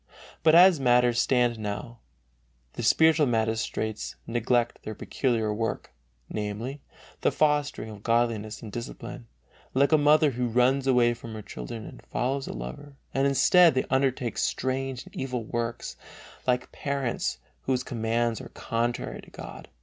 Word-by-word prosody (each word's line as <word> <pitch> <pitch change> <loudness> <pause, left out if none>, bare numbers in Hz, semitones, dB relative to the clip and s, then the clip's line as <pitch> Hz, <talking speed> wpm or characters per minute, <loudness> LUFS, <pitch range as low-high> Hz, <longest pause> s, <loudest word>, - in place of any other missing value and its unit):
But 160 0 +5
as 180 -2 +8
matters 120 -2 +4
stand 120 -3 +2
now 110 +3 -5 0.7
the - - -5
spiritual 155 +5 +4
magistrates 110 -1 -1
neglect 120 +1 0
their 110 - -6
peculiar 115 -4 -1
work, 115 +1 -3 0.3
namely, 110 +7 -4 0.4
the - - +2
fostering 145 -7 +1
of 105 -1 -11
godliness 115 -2 0
and 110 - -7
discipline, 115 - -7 0.5
like 140 +3 +4
a 155 - +6
mother 150 0 +5
who 125 0 -1
runs 125 +3 +2
away 120 -2 +4
from 115 -1 -9
her 110 - -7
children 110 +2 -7
and - - -11
follows 135 +2 -1
a - - -5
lover, 135 - -8 0.2
and 135 +1 +2
instead 165 +5 +5
they 130 - +1
undertake 130 -3 +1
strange 130 -1 -2
and - - -15
evil 125 -3 -3
works, 115 +1 -4 0.5
like 125 0 +1
parents 140 - -2 0.3
whose 130 -1 +1
commands 115 -1 -1
are - - -9
contrary 120 +1 -2
to - - -16
God. 65 +2 -10
120 Hz, 145 wpm, -27 LUFS, 115-135 Hz, 0.7 s, as